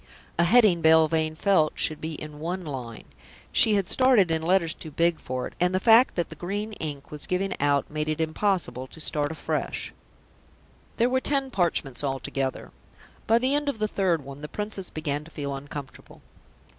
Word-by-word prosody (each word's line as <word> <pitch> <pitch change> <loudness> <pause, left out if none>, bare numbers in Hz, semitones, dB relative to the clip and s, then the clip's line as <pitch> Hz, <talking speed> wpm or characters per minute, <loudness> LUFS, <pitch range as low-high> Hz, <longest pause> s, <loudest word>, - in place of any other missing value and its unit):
A 170 - +5
heading, 200 -3 +5
Belvane 160 0 +4
felt, 160 -3 +2
should 155 - -1
be 160 +1 -4
in 150 0 -9
one 175 +3 -4
line; 125 -6 -6 0.5
she 215 - +5
had 195 -3 0
started 250 -9 +4
in 160 0 0
letters 170 -1 +2
too 160 - -10
big 165 +2 +1
for 130 0 -4
it, - - -8
and 180 +1 +2
the - - +2
fact 230 +4 +5
that 175 - -1
the - - -9
green 205 +4 -4
ink 145 -3 -6
was 150 -1 -5
giving 190 +1 -1
out 140 -1 +2
made 155 0 -2
it 155 0 -2
impossible 160 -5 -1
to 160 - -14
start 150 -1 0
afresh. 160 - -3 1.0
There 235 - +3
were 260 +1 +1
ten 275 -1 +1
parchments 165 - 0
altogether. 135 -1 -3 0.6
By 225 - +5
the 255 +3 +1
end 290 0 +1
of 280 - -3
the 215 0 0
third 180 -8 0
one, 140 +1 -9
the 150 - -5
Princess 205 0 -4
began 150 -2 -3
to 160 - -14
feel 140 -3 -5
uncomfortable. 140 -1 -9
165 Hz, 185 wpm, -26 LUFS, 150-200 Hz, 1.0 s, A